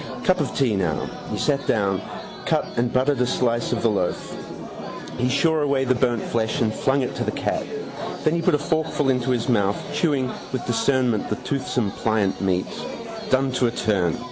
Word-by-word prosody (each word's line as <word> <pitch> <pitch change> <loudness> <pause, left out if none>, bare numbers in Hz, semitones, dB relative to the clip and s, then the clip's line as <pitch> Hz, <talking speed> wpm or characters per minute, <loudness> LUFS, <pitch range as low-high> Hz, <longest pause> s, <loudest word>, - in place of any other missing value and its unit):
Cup 185 -1 +3
of 145 - -1
tea 125 -7 +3
now. 85 -6 0 0.2
He - - -2
sat 140 -1 +1
down, 100 -3 +2 0.5
cut - - +2
and 120 0 +1
buttered 130 +1 +2
a 125 - +3
slice 120 -2 +1
of - - -1
the 115 - +5
loaf. 90 -4 -1 0.8
He 125 +1 +2
shore 155 +4 +3
away 140 -2 +2
the 130 - +4
burnt 120 -3 +1
flesh 115 +4 0
and 110 -2 +2
flung 135 +4 +2
it 125 - -2
to - - 0
the - - -1
cat. - - -1 0.6
Then 155 - +3
he 170 - +1
put 155 - +4
a - - +3
forkful 150 -1 0
into 125 0 0
his 125 -1 +1
mouth, 100 -5 +2 0.2
chewing 140 -6 +1 0.2
with 130 - -3
discernment 125 -2 +1
the 105 - 0
toothsome 125 -6 0
pliant 110 -3 0
meat. 95 -2 +1 0.6
Done 130 0 +3
to 125 -1 +3
a - - 0
turn. 95 -8 +1
125 Hz, 195 wpm, -23 LUFS, 110-140 Hz, 0.8 s, the